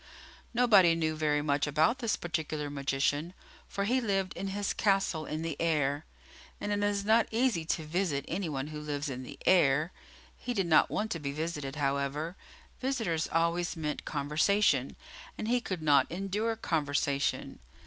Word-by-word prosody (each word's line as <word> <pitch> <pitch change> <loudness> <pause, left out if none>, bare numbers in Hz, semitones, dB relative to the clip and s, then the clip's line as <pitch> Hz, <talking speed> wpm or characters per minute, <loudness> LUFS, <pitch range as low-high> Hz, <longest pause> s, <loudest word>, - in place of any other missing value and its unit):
Nobody 210 -9 +5
knew 160 -1 0
very 150 -1 +1
much 145 -1 +1
about 160 - +2
this 230 -5 0
particular 155 -3 -3
magician, 145 +4 -1 0.3
for 200 - -2
he 250 +6 +2
lived 195 -4 0
in 195 - -4
his 200 +1 -2
castle 195 -6 +1
in 155 +1 -3
the 165 -3 -3
air, 150 -3 +1 0.5
and 205 - -3
it 205 0 0
is 205 -1 0
not 225 +1 +4
easy 225 -8 +1
to 160 0 -1
visit 155 -3 -1
any 175 0 -2
one 140 0 -3
who 155 -1 -6
lives 145 -1 -3
in 130 0 -5
the 130 - -9
air. 155 -2 +4 0.5
He 245 -1 -4
did 195 -3 +1
not 165 -2 +5
want 220 +1 -2
to 165 - -2
be 140 -2 -3
visited, 150 -2 -4
however; 140 +3 -1 0.4
visitors 225 - -1
always 170 +1 +1
meant 150 -2 -3
conversation, 150 0 +1 0.4
and 215 - -4
he 245 +1 +2
could 185 -8 -4
not 145 -2 +4
endure 200 +5 -1
conversation. 145 -7 -1
165 Hz, 165 wpm, -30 LUFS, 145-200 Hz, 0.5 s, Nobody